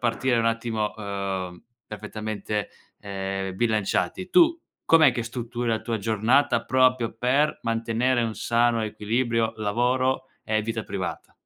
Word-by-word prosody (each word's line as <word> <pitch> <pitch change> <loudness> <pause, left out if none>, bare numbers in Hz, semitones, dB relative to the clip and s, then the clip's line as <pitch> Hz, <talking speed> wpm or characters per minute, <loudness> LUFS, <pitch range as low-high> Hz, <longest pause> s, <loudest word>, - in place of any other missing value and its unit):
partire 120 +1 +1
un 115 - +1
attimo, 115 -2 -1
uhm, 95 -3 -4 0.2
perfettamente, 105 0 -4 0.3
ehm, 95 -1 -4
bilanciati, 110 - 0
tu 335 - +4 0.2
com'è 155 -5 +6
che 120 - -2
strutturi 120 +1 -4
la 110 -1 +1
tua 115 -2 -2
giornata 115 +6 +2
proprio 130 -3 +2
per 135 +6 +1
mantenere 115 +2 +1
un 115 -2 -2
sano 120 -1 +1
equilibrio 115 +2 -1
lavoro 125 +5 +1 0.2
e 110 0 +1
vita 110 0 -3
privata? - - -5
115 Hz, 125 wpm, -25 LUFS, 105-125 Hz, 0.3 s, com'è